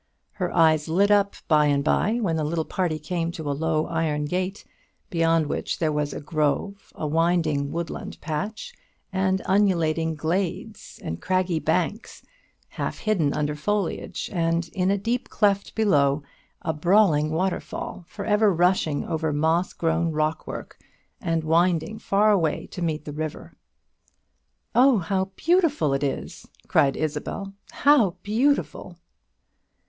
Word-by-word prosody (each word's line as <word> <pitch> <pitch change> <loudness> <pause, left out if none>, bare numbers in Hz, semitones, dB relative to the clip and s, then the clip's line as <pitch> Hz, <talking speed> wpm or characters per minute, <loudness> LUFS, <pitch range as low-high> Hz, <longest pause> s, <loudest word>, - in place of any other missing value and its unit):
Her 185 -4 -3
eyes 160 -3 +3
lit 195 +6 +3
up 200 -1 +3
by 150 -2 +4
and 140 -1 +2
by, 205 +7 +2
when 185 -8 0
the 160 - -1
little 160 +1 -1
party 175 -4 -1
came 165 +2 -3
to 160 -3 -6
a 145 - 0
low 155 +1 0
iron 155 -3 -1
gate, 185 +5 -3 0.5
beyond 165 -2 +2
which - - -3
there 160 -2 0
was 150 -1 -1
a - - -5
grove, 155 +6 -2
a - - -4
winding 155 -2 +1
woodland 170 -1 -5
patch, 205 - -4 0.4
and 190 0 +1
undulating 165 -5 +2
glades, 185 +6 -3
and 80 - -5
craggy 185 -3 0
banks 180 +7 -2 0.5
half - - -4
hidden 185 -10 +1
under 150 0 -1
foliage, 200 +4 -2
and, 165 -1 0
in 185 -2 0
a 200 - +2
deep 235 +5 -2
cleft 200 -2 +1
below, 145 -9 +2 0.4
a 160 - -1
brawling 160 -2 +3
waterfall 180 +2 -3
for 200 +1 -7
ever 210 -1 +4
rushing 175 -4 +1
over 160 -2 -1
moss 160 +4 +1
grown 165 0 0
rockwork, 155 +1 -3 0.4
and 165 -5 0
winding 170 +4 +1
far 210 +2 +3
away 165 -7 +1
to 180 - -8
meet 155 -2 -2
the 150 - -6
river. 155 0 -5 1.2
"Oh, 255 0 +5
how 190 +1 0
beautiful 330 - +2
it 135 - 0
is!" 140 -2 -4 0.2
cried 135 -1 +3
Isabel; 155 +6 -3 0.2
"how 250 -11 +3
beautiful!" 250 +8 0
170 Hz, 140 wpm, -24 LUFS, 155-195 Hz, 1.2 s, Oh